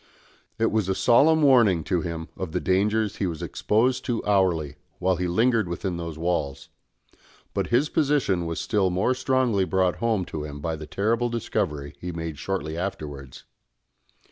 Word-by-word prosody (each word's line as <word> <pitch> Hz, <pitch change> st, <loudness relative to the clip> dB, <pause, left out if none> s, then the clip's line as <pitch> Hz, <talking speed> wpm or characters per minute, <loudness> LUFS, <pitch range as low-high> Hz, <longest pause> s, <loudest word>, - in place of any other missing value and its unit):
It 115 Hz, 0 st, +1 dB
was 105 Hz, -3 st, 0 dB
a 95 Hz, -, +1 dB
solemn 155 Hz, +9 st, +4 dB
warning 115 Hz, -, +5 dB
to 90 Hz, +1 st, 0 dB
him 80 Hz, -1 st, -5 dB
of 90 Hz, -4 st, -5 dB
the -, -, +1 dB
dangers 105 Hz, +3 st, +1 dB
he 100 Hz, -, 0 dB
was 80 Hz, -3 st, -5 dB
exposed 125 Hz, +4 st, +1 dB
to 120 Hz, -2 st, -2 dB
hourly, 85 Hz, -8 st, +1 dB, 0.2 s
while 95 Hz, 0 st, +1 dB
he 90 Hz, +1 st, -1 dB
lingered 110 Hz, +3 st, +2 dB
within 85 Hz, +1 st, -3 dB
those 85 Hz, -2 st, -5 dB
walls; 75 Hz, -5 st, -2 dB, 0.8 s
but -, -, -1 dB
his 125 Hz, +5 st, +2 dB
position 140 Hz, -, +1 dB
was 85 Hz, -, -3 dB
still 100 Hz, -4 st, +1 dB
more 95 Hz, +8 st, +1 dB
strongly 130 Hz, -5 st, +1 dB
brought 95 Hz, -1 st, +1 dB
home 110 Hz, -5 st, 0 dB
to 75 Hz, -3 st, -5 dB
him 75 Hz, -1 st, -7 dB
by 80 Hz, +2 st, -2 dB
the 75 Hz, 0 st, -8 dB
terrible 115 Hz, +7 st, 0 dB
discovery 75 Hz, -11 st, -2 dB
he 90 Hz, -, -5 dB
made 80 Hz, -3 st, -5 dB
shortly 85 Hz, -5 st, -3 dB
afterwards. 75 Hz, -7 st, -6 dB
95 Hz, 170 wpm, -25 LUFS, 80-115 Hz, 0.8 s, warning